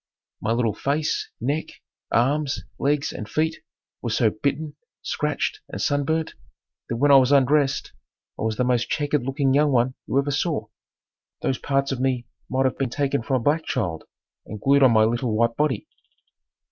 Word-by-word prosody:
My 110 - -1
little 115 -2 +1
face, 150 +3 -1
neck, 145 +7 -2 0.4
arms, 140 +4 +1 0.2
legs 145 +1 0
and 105 - -7
feet 160 +1 -1 0.4
were 120 - -3
so 110 0 +2
bitten, 145 +7 -2 0.3
scratched - - -1
and - - -6
sunburned 155 +3 0 0.6
that 115 - -1
when 145 +4 +4
I 140 - +9
was 130 0 +4
undressed 140 0 +3 0.5
I - - -5
was 110 -1 -1
the - - +2
most 125 -1 +1
checkered 145 0 0
looking 135 +1 0
young 145 +1 +4
one 125 0 +2
you - - 0
ever 140 +1 +1
saw. 145 - -1 0.7
Those 130 - 0
parts 140 0 0
of 135 - -2
me 130 -2 0 0.2
might 130 +1 +1
have 130 - 0
been 135 -2 0
taken 140 +1 0
from 130 +3 -1
a - - -8
black 155 +4 +2
child 90 - -2 0.4
and 105 - -7
glued 140 +6 +4
on 130 -3 +7
my 110 -1 +5
little 115 0 0
white 115 0 +2
body. 145 -7 0
135 Hz, 175 wpm, -24 LUFS, 120-145 Hz, 0.7 s, I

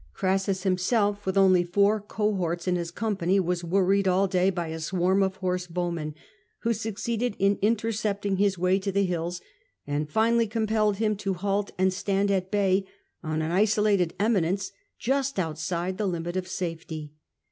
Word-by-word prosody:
Crassus 190 0 0
himself, 200 +2 +1
with 190 +1 0
only 185 -2 +5
four 200 +4 +2
cohorts 190 -5 -2
in 180 - +2
his 170 -1 -2
company, 195 -1 0
was 180 -1 -1
worried 195 +2 +2
all 190 +2 +3
day 185 0 +2
by 175 -3 -3
a 160 0 -5
swarm 185 +4 +1
of 190 -1 +1
horse 180 -1 -2
bowmen, 170 -3 -3 0.5
who 230 0 +1
succeeded 225 +1 -2
in 200 +1 +2
intercepting 210 -2 0
his 200 -1 +2
way 185 +2 +2
to 195 +1 -2
the 200 +1 +2
hills, 175 0 -3 0.4
and 145 +1 -2
finally 230 +5 +2
compelled 215 -2 +1
him 215 0 +1
to 195 -2 -2
halt 200 +2 -1
and 185 0 +2
stand 200 +1 0
at 190 -1 0
bay 195 -1 +2 0.4
on 155 0 -2
an 160 - -2
isolated 205 -2 +2
eminence 195 -3 +1 0.3
just 270 +1 -1
outside 170 +2 -2
the 210 - 0
limit 175 -1 -3
of 185 -1 -2
safety. 160 -4 -5
190 Hz, 165 wpm, -26 LUFS, 175-205 Hz, 0.5 s, only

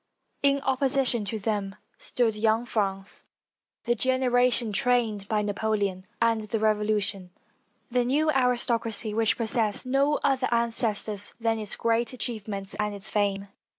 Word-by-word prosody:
In 280 0 +2
opposition 265 -4 +1
to 220 +3 -3
them 205 -2 -2 0.2
stood 230 -3 -1
young 220 +2 +1
France, 195 -4 -3 0.6
the 240 - +1
generation 250 -2 +1
trained 225 -3 0
by 210 -1 0
Napoleon 205 -2 -2
and 230 -1 +2
the 215 +1 -3
Revolution 210 -3 0 0.3
— - - -42
the 250 0 +2
new 295 +5 +2
aristocracy 240 -4 0
which 225 0 +1
pos 225 -2 -1
sessed 220 0 +2
no 275 +3 +2
other 265 -2 +1
ancestors 225 -3 0
than 225 -1 0
its 215 -1 0
great 230 +1 0
achievements 210 -5 -3
and 210 -1 -1
its 200 - -7
fame. 200 -1 0
225 Hz, 140 wpm, -26 LUFS, 210-245 Hz, 0.6 s, In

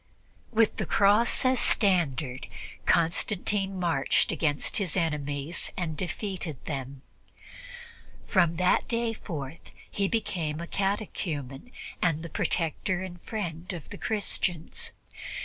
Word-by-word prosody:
With 225 -1 +3
the - - -1
Cross 210 +6 +4
as 255 -1 +4
standard, 150 - +2 0.4
Constantine 195 +3 +2
marched 165 -6 +2
against 150 -3 +1
his 195 -3 0
enemies 150 -1 -1
and 165 -4 -2
defeated 180 - -3
them. 135 -2 -5 1.2
From 170 -1 +3
that 180 +2 +3
day 230 -1 0
forth 160 -7 -7 0.2
he 200 -1 +1
became 175 -8 -1
a 170 - -4
catechumen 185 - -2 0.3
and 165 -2 +2
the 170 - -6
protector 175 +2 0
and 175 -2 -8
friend 175 -5 -4
of 170 -4 -8
the - - -7
Christians. 210 - -1
175 Hz, 115 wpm, -28 LUFS, 155-200 Hz, 1.2 s, Cross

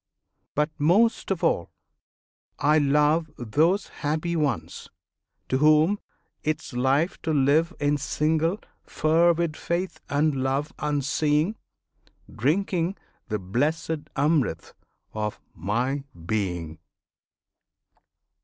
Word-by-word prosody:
But 150 +2 +1
most 195 +10 +3
of 195 -4 -1
all 85 - +1 0.9
I 150 +2 +4
love 150 +3 +3
Those 155 - +2 0.2
happy 155 +3 -1
ones 120 - -2 0.6
to 130 - 0
whom 155 +7 +4 0.4
'tis 155 -2 -2
life 135 +8 +1
to 160 - -1
live 150 +4 +3
In 145 0 +2
single 160 +6 +1 0.3
fervid 165 +1 +2
faith 175 +4 -3
and 150 +2 +2
love 135 +3 -1
unseeing, 150 +5 +1 0.8
Drinking 170 - 0 0.3
the 105 -3 -1
blessed 150 - -2
Amrit 140 - 0 0.4
of 105 -1 -3
my 125 +8 -1 0.2
Being! 90 -6 -2
150 Hz, 95 wpm, -25 LUFS, 135-165 Hz, 0.9 s, I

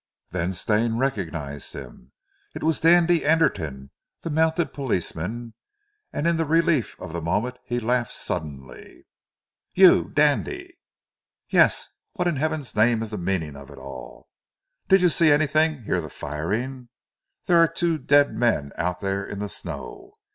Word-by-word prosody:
Then 90 +1 -1
Stane 110 +5 0
recognized 80 - -3
him. 65 -1 -11 0.4
It - - -6
was 160 0 +1
Dandy 170 0 +4
Anderton, 80 - 0 0.3
the 165 - -3
mounted 160 +2 +1
policeman, 115 - -3 0.6
and 150 - -3
in 170 -1 +2
the 165 - 0
relief 165 -4 +1
of 80 - -8
the 85 - -3
moment 105 +10 -1
he 120 0 -2
laughed 120 0 0
suddenly. 70 -7 -7 0.7
"You, 185 -1 +6
Dandy?" 345 - 0 0.8
"Yes! - - +4 0.3
What 180 -4 -1
in 170 -5 0
heaven's 155 -1 -2
name 115 +1 +3
is 110 - -7
the 105 - -4
meaning 85 -5 -2
of 70 -1 -11
it - - -12
all? 65 -3 -10 0.6
Did 190 -1 +5
you 180 - +6
see 165 -1 +4
anything? 155 -1 +2
Hear 90 -4 0
the 80 - -8
firing? 110 - -4 0.6
There 170 -1 +4
are 165 - +6
two 165 -1 -1
dead 145 -1 +4
men 95 -13 0
out 90 +1 -2
there 100 0 -1
in 100 - -7
the 105 0 -4
snow." 395 - -8
120 Hz, 150 wpm, -24 LUFS, -, 0.8 s, You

